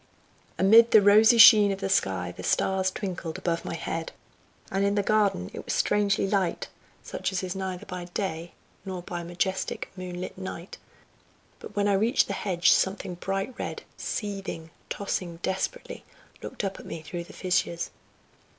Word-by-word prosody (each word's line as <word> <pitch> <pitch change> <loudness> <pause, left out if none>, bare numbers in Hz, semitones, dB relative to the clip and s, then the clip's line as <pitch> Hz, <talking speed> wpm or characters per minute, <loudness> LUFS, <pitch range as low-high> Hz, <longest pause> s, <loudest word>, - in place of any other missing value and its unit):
Amid 220 +6 +7
the 220 - +7
rosy 215 +3 +6
sheen 215 -3 +9
of 195 - -3
the 195 - -2
sky 95 - 0
the - - -8
stars 190 0 +1
twinkled 185 -4 -5
above 170 -1 -2
my - - -4
head, 165 0 -4 0.6
and 195 +1 0
in 200 0 +1
the 205 - +1
garden 200 - +1
it - - -7
was - - -2
strangely 205 -1 +2
light, 190 -3 -1 0.3
such - - -3
as 190 0 -2
is 185 0 -4
neither 190 -2 -4
by 180 -2 -6
day, 175 -2 -4 0.3
nor 185 -2 -6
by 175 -1 -5
majestic, 175 +2 -3
moon 180 -1 -6
lit 180 - -6
night, 185 -1 -7 0.8
but - - -11
when 205 0 +1
I 200 - +3
reached 220 +5 +3
the - - -4
hedge 175 -4 +2
something 190 -1 +1
bright 195 +6 -3
red, - - -5
seething, 195 -6 -5 0.2
tossing 180 -4 -3
desperately, 190 - -3 0.4
looked - - -6
up 195 -1 -3
at - - -11
me 160 - -7
through 170 +1 -6
the - - -14
fissures. 180 -2 -1
190 Hz, 170 wpm, -27 LUFS, 175-200 Hz, 0.8 s, sheen